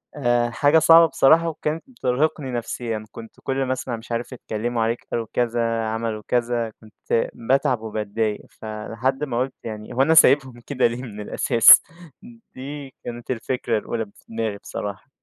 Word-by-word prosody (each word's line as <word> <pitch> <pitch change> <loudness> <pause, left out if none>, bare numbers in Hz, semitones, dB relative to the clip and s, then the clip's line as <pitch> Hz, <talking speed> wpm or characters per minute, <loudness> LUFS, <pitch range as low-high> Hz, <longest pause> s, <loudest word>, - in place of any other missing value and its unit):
آآ 120 -4 +1
حاجة 145 +6 +3
صعبة 165 +1 +7
بصراحة 160 +2 +4
وكانت 155 0 -3
بترهقني 140 - -1
نفسيًا. 115 -2 -4
كنت 115 -1 -12
كل 135 0 -1
مثلًا 130 -1 -3
مش 115 +2 -12
عارف 120 +2 -3
اتكلّموا 120 0 -3
عليك 115 +2 -2
قالوا 115 -1 -2
كذا، 115 -1 0
عملوا 110 -1 -3
كذا، 120 -1 0
كنت 110 +1 -2
باتعب 125 0 +1
وباتضايق. 110 0 -2
فلحد 115 +5 -4
ما 125 -5 -2
قُلت 130 +1 -1
يعني 110 -1 -7
هو 125 - +1
أنا 160 +4 +4
سايبهم 135 -5 +5
كده 130 -4 +2
ليه 120 +1 -5
من 105 -4 -8
الأساس؟ 115 +2 +6 0.7
دي 140 0 -8
كانت 120 +1 -6
الفكرة 120 -1 -1
الأولى 110 +1 -3
ب - - -20
في - - -22
دماغي 110 -2 -3
بصراحة. 100 +4 -7
120 Hz, 160 wpm, -22 LUFS, 115-135 Hz, 0.7 s, صعبة